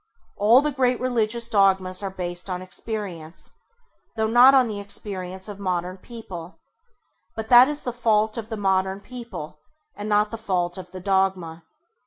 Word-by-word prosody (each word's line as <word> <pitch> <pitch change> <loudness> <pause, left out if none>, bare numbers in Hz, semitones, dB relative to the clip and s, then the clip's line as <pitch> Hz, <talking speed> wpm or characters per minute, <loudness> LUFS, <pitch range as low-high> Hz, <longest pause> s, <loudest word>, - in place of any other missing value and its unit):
All 225 +6 +5
the 300 0 -1
great 255 -3 +1
religious 235 -2 0
dogmas 190 -4 +3
are 195 - -3
based 180 -1 -5
on 180 0 -4
experience, 185 -5 -7 0.6
though 220 -1 0
not 245 +4 +7
on 260 -2 +5
the 210 -2 -5
experience 190 -2 -6
of 205 -1 -8
modern 185 -1 -3
people; 190 -6 -10 0.8
but 220 0 -6
that 245 +1 +9
is 295 0 -3
the 245 - -3
fault 220 -2 +1
of 225 -2 -6
modern 190 -1 0
people 230 -10 -9 0.4
and 205 +1 -6
not 210 0 +2
the 225 - -5
fault 180 -4 -1
of 185 - -10
the 185 +1 -9
dogma. 185 -4 -1
200 Hz, 160 wpm, -24 LUFS, 185-230 Hz, 0.8 s, that